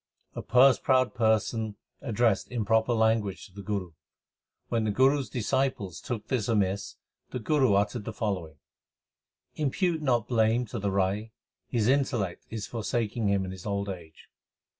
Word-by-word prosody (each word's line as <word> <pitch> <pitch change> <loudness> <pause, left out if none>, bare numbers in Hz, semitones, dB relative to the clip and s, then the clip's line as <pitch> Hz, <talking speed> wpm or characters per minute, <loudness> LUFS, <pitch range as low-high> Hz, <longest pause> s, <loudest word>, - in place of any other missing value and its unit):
A - - -5
purse 130 +2 +5
proud 130 -2 +2
person 110 -1 +1 0.3
addressed 115 -4 +1
improper 110 0 +1
language 110 -3 +1
to 95 - -17
the 100 - -8
Guru. 100 -4 -3 0.8
When 115 -2 0
the 110 - 0
Guru 135 +7 +4
s 135 - -5
disciples 120 - -1
took 115 -4 -5
this 125 -6 -1
amiss, 100 -3 0 0.3
the - - -4
Guru 130 -2 +2
uttered 105 +2 0
the - - -3
following: 95 -8 -3 1.0
Impute 160 +3 0
not 120 -6 +1
blame 115 0 +2
to 115 +1 -5
the 100 0 -1
Rai; 100 +3 -1 0.4
2 125 - -2
his 110 -1 +2
intellect 125 -9 0
is 110 -2 -4
forsaking 115 -1 -2
him 100 -1 +1
in 95 - -5
his 95 +1 -8
old 100 0 -2
age. 85 -4 -9
110 Hz, 160 wpm, -28 LUFS, 100-125 Hz, 1.0 s, purse